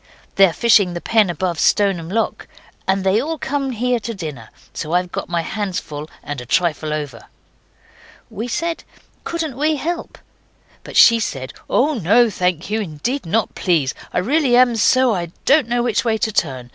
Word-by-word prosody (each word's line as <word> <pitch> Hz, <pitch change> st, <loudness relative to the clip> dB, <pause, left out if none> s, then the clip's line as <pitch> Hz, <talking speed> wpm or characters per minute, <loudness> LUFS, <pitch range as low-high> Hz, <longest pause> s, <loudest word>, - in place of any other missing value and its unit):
They're 195 Hz, -2 st, +5 dB
fishing 200 Hz, -3 st, +3 dB
the -, -, -3 dB
pen 215 Hz, 0 st, +2 dB
above 175 Hz, 0 st, -2 dB
Stoneham 195 Hz, -5 st, +2 dB
Lock. 225 Hz, +4 st, -2 dB, 0.4 s
And 190 Hz, 0 st, +1 dB
they 190 Hz, +3 st, +3 dB
all 320 Hz, +4 st, -3 dB
come 280 Hz, -1 st, -2 dB
here 250 Hz, 0 st, 0 dB
to 230 Hz, +1 st, -6 dB
dinner. 150 Hz, -, -7 dB, 0.2 s
So 160 Hz, +1 st, -5 dB
I've 180 Hz, 0 st, +1 dB
got -, -, -5 dB
my 170 Hz, -1 st, -1 dB
hands 200 Hz, 0 st, -3 dB
full 150 Hz, 0 st, -8 dB
and 145 Hz, -3 st, -5 dB
a -, -, -9 dB
trifle 155 Hz, 0 st, 0 dB
over.' 145 Hz, -6 st, -5 dB, 1.0 s
We 225 Hz, +4 st, -6 dB
said, 335 Hz, +7 st, -3 dB, 0.4 s
'Couldn't 320 Hz, -6 st, -4 dB
we 305 Hz, +2 st, +1 dB
help?' 340 Hz, +4 st, -4 dB, 0.7 s
But -, -, -6 dB
she 230 Hz, -1 st, +7 dB
said, 135 Hz, -11 st, -4 dB, 0.2 s
'Oh, 295 Hz, +4 st, +2 dB
no, 225 Hz, -, +3 dB
thank 180 Hz, -3 st, -1 dB
you. 220 Hz, +1 st, 0 dB
Indeed 195 Hz, -, -4 dB
not, 220 Hz, +6 st, 0 dB
please. 160 Hz, -8 st, +1 dB, 0.2 s
I -, -, -3 dB
really 265 Hz, -, +2 dB
am 250 Hz, -2 st, +5 dB
so 255 Hz, +2 st, +3 dB
I 175 Hz, -3 st, -2 dB, 0.2 s
don't 280 Hz, -3 st, +4 dB
know 240 Hz, 0 st, +1 dB
which 235 Hz, -3 st, 0 dB
way 225 Hz, -2 st, +1 dB
to 220 Hz, -, -1 dB
turn. 130 Hz, -, -2 dB
205 Hz, 180 wpm, -19 LUFS, 170-245 Hz, 1.0 s, she